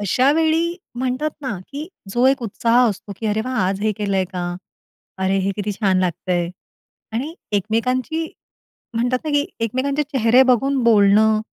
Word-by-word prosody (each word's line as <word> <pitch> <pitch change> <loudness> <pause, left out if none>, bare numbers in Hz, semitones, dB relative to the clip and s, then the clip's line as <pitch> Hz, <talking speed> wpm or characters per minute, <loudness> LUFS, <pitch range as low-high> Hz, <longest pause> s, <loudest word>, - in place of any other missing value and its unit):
अशा 250 +8 +3
वेळी 325 +2 +1 0.2
म्हणतात 260 +4 -1
ना, 255 -7 -3
की 295 +3 -6 0.2
जो 240 +4 +3
एक 270 -1 +2
उत्साह 230 +2 +1
असतो 205 0 -5
की 225 - -4
"अरे 215 +1 +1
वाह! 255 0 -3
आज 195 +1 -2
हे 215 0 +2
केलं 200 -2 -1
आहे 190 - +2
का? 180 -1 -5 0.8
अरे! 190 +1 +2
हे 195 +1 0
किती 205 0 -2
छान 195 -2 +1
लागतं 180 0 -1
आहे" 175 -1 0 0.6
आणि 280 +9 -3 0.2
एकमेकांची 250 - 0 0.7
म्हणतात 245 +2 +1
ना 305 - -2
की 290 0 +2 0.2
एकमेकांचे 275 +6 0
चेहरे 260 -3 +4
बघून 270 +2 +1
बोलणं 215 0 +5
230 Hz, 165 wpm, -21 LUFS, 205-270 Hz, 0.8 s, बोलणं